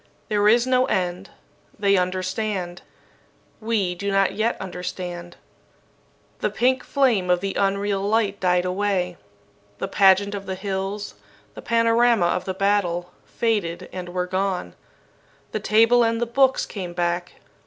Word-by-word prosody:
There 210 -1 +2
is 235 +3 +5
no 255 0 +2
end. 180 +1 -2 0.5
They 200 -1 +3
understand. 185 0 -2 0.8
We 215 -5 0
do 200 +3 -4
not 195 0 +2
yet 225 +2 -1
understand." 180 -1 -6 1.0
The - - 0
pink 255 +2 +1
flame 240 -10 +1
of 180 0 +3
the 195 +1 -3
unreal 200 0 0
light 205 -1 0
died 180 -1 +2
away. 180 -1 -1 0.6
The - - -3
pageant 200 +1 +4
of 200 -1 -6
the 190 - -3
hills, 195 +1 -4 0.4
the - - -9
panorama 230 -3 +3
of 175 +1 0
the 190 - -3
battle, 185 -3 0
faded 185 -6 -2
and 180 -1 -6
were 180 0 -2
gone. 185 - -2 0.8
The - - -2
table 230 +3 +4
and 230 0 +1
the 240 - 0
books 265 +3 +2
came 180 -4 -6
back. 175 0 -2
195 Hz, 140 wpm, -23 LUFS, 180-215 Hz, 1.0 s, is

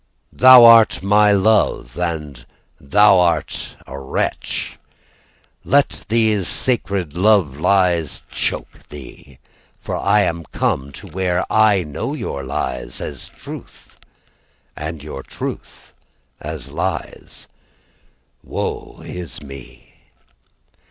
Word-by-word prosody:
Thou 130 -1 +8
art 115 -4 +6
my 105 +1 +4
love, 100 - +1
And 75 -7 -4 0.4
thou 100 +6 +4
art 85 -4 -1
a 70 - -8
wretch. 65 - -3 0.8
Let 140 +1 +1
these 110 -4 +2
sacred 100 - 0
love 90 -6 +2
lies 90 -4 +1
choke - - -4
thee, 70 -1 -12 0.4
From - - -5
I 105 - +4
am 85 -3 -1
come 70 -1 -2
to 70 - -11
where 90 +1 -1
I 105 -4 +4
know 75 -3 -5
your 70 - -5
lies 60 -2 -4
as - - -7
truth - - -12 0.8
And 75 0 -6
you 75 -3 -7
truth - - -8 0.5
as 70 +2 -7
lies 85 +3 -5 1.0
Woe - - -5
is 85 -7 -7
me. 70 -2 -13
90 Hz, 105 wpm, -19 LUFS, 70-105 Hz, 1.0 s, Thou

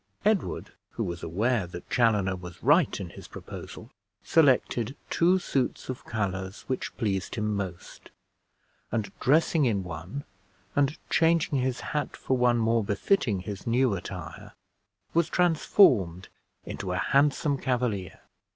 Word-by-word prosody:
Edward, 210 -2 0 0.2
who - - -2
was 85 -1 -4
aware 105 +4 0
that 85 0 -9
Chaloner 105 -6 +2
was 90 -1 -10
right - - +4
in - - -6
his - - -11
proposal, - - -9 0.3
selected 130 -5 +2
two 180 +3 +4
suits 135 -10 -2
of 130 - -5
colors 95 -3 -3
which 130 - -4
pleased 100 -4 -1
him 105 -2 -1
most; 95 -3 -6 0.8
and 110 -4 -2
dressing 155 +2 +3
in 105 -5 +1
one, 90 - -6 0.5
and 145 +1 +2
changing 165 -4 +3
his 130 0 -1
hat 150 -3 -2
for 130 - 0
one 125 -1 +3
more 115 0 +2
befitting 105 - +1
his 100 +2 -7
new 125 0 +3
attire, 90 - -7 0.6
was 170 0 +2
transformed 130 - +3 0.4
into 95 -2 -5
a 90 - -1
handsome 140 - +2
Cavalier. 115 -8 -2
115 Hz, 135 wpm, -27 LUFS, 95-140 Hz, 0.8 s, right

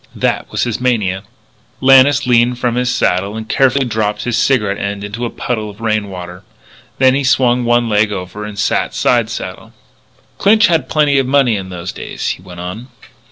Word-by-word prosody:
That - - -1
was - - -1
his 120 -1 -3
mania." 105 -7 0 0.6
Lannis 135 +1 +5
leaned 120 0 +3
from 125 -1 -1
his 125 +1 0
saddle 100 -1 0
and 110 0 -6
carefully 135 +2 +2
dropped 110 -3 -2
his 120 -2 -1
cigarette 110 -5 +1
end 100 0 -4
into 105 +4 -4
a - - -2
puddle 110 -4 -4
of 100 +1 -13
rain 110 -3 -1
water. 90 -1 -8 0.6
Then 130 -1 +4
he 140 +1 0
swung 125 -2 +2
one 120 0 +2
leg 105 -1 +2
over 95 +1 -6
and 105 -1 -7
sat 100 - 0
side - - +2
saddle. - - -7 0.7
"Clinch 215 +2 +5
had 165 -2 +1
plenty 150 -3 +3
of 135 - 0
money 135 -4 +3
in 95 -2 -5
those 90 0 -6
days," - - -5
he - - -4
went 90 -1 -11
on. 90 +8 -7
115 Hz, 190 wpm, -15 LUFS, 100-125 Hz, 0.7 s, Lannis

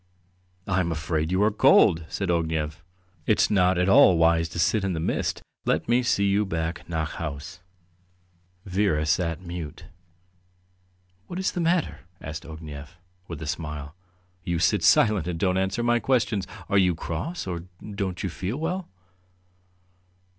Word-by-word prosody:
"I 95 -1 +1
am 85 -2 0
afraid 80 0 -2
you 95 +2 +2
are 110 - +3
cold," 80 -5 +5
said 100 -3 -3
Ognev. 80 -1 -1 0.5
"It's 110 - +3
not 90 -2 +3
at 90 +1 +2
all 95 -2 +7
wise 80 0 +3
to 85 - -8
sit 95 +5 +2
in 95 -1 0
the 80 - -2
mist. 80 - -2 0.2
Let - - 0
me 120 +2 +3
see 100 -4 +1
you 100 +1 +2
back 85 -3 -4
nach 80 -2 -2
haus." 75 0 -6 1.1
Vera 95 -5 +1
sat 85 +2 0
mute. 85 -4 -7 1.4
"What 175 - -6
is 190 - 0
the 180 - -3
matter?" 170 +1 +1 0.2
asked 80 +2 -7
Ognev, 75 -2 -9 0.3
with 80 - -7
a - - -5
smile. 75 -2 -5 0.5
"You 85 -2 -1
sit 80 - +2
silent 105 -6 +4
and 90 -2 -2
don't 90 +1 +1
answer 95 +5 -1
my 120 0 +3
questions. 110 -5 0 0.2
Are 100 - +3
you 90 -3 +3
cross, 115 - -4
or 85 -2 -5 0.3
don't 95 -3 -3
you 95 - -1
feel 95 +8 -4
well?" 180 +3 -3
90 Hz, 155 wpm, -25 LUFS, 80-100 Hz, 1.4 s, all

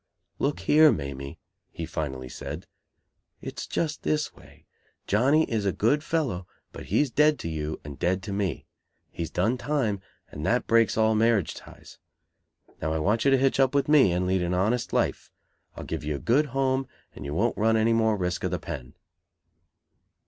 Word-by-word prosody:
"'Look 140 +1 -1
here, 155 0 +6
Mamie,' 70 -1 -5 0.3
he 85 - -6
finally 65 -5 -4
said. 75 +8 -7 0.7
'It's - - -6
just 155 -2 -2
this 150 0 -1
way. - - -18 0.4
Johnny 135 +10 +3
is 110 -7 -1
a 100 - +1
good 140 +11 +1
fellow, 130 - -1 0.2
but - - -9
he's 120 - +1
dead 150 +2 +4
to - - -6
you 80 -1 -4
and 70 -2 -9
dead 95 +2 0
to 100 - -5
me. 100 -7 -2 0.5
He's 85 - -4
done 110 +8 0
time, 120 -9 -1 0.3
and 75 - -7
that 125 +9 +1
breaks 115 -3 +3
all 110 0 +4
marriage 110 -4 +2
ties. - - -14 0.8
Now, 80 +1 -1
I - - 0
want 105 - +1
you - - +6
to 135 - +5
hitch 135 +1 +1
up 135 +1 +3
with 140 - +2
me, 145 -10 +5
and 90 +1 0
lead 95 0 +1
an 90 +1 0
honest 110 +7 0
life. - - 0 0.5
I'll - - -7
give 80 -2 -4
you 75 0 -2
a - - -3
good 135 - +2
home, 135 0 0 0.3
and - - -9
you 70 +1 -4
won't 115 +6 +1
run 110 +1 +2
any 110 +1 +3
more 110 -2 +2
risk 90 -1 -2
of - - 0
the - - -1
pen!'" 60 -1 -7
110 Hz, 185 wpm, -26 LUFS, 85-135 Hz, 0.8 s, here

